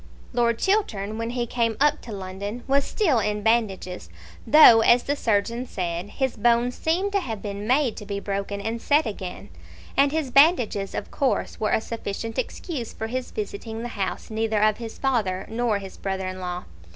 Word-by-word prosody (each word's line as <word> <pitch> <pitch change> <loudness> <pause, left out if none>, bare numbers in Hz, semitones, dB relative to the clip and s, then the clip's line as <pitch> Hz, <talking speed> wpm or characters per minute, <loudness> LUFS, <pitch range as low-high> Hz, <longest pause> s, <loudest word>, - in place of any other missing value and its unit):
Lord 235 -1 +2
Chiltern 220 - 0
when 230 0 -2
he 240 0 -1
came 230 -2 0
up 295 +1 +3
to 235 - -9
London 200 +4 -6
was 275 +1 +3
still 320 - +2
in 210 0 -1
bandages, 205 -5 0 0.4
though, 270 -7 +9
as 240 +2 +5
the 285 - 0
surgeon 235 +1 0
said, 175 -1 -3
his 265 +2 -2
bones 235 +2 +3
seemed 360 +8 0
to 400 - +2
have 225 - -5
been 205 0 -5
made 255 -1 +2
to 210 - -7
be 200 -1 -3
broken 200 0 -3
and 225 +3 -3
set 295 +1 +3
again; 190 -4 -6 0.5
and 275 0 +4
his 305 -4 -2
bandages 250 - +4
of - - -5
course 270 -2 -1
were 215 -1 0
a - - +3
sufficient 225 0 -4
excuse 265 -10 -4
for 220 - -5
his 250 +3 -3
visiting 220 +2 -5
the 240 - -4
house 200 0 -4
neither 220 -1 0
of 215 -1 +3
his 230 -2 -7
father 210 -9 0
nor 230 -2 +1
his 195 -1 -9
brother 190 -1 -3
in 185 0 -5
law. 180 -1 -4
225 Hz, 190 wpm, -24 LUFS, 200-250 Hz, 0.5 s, though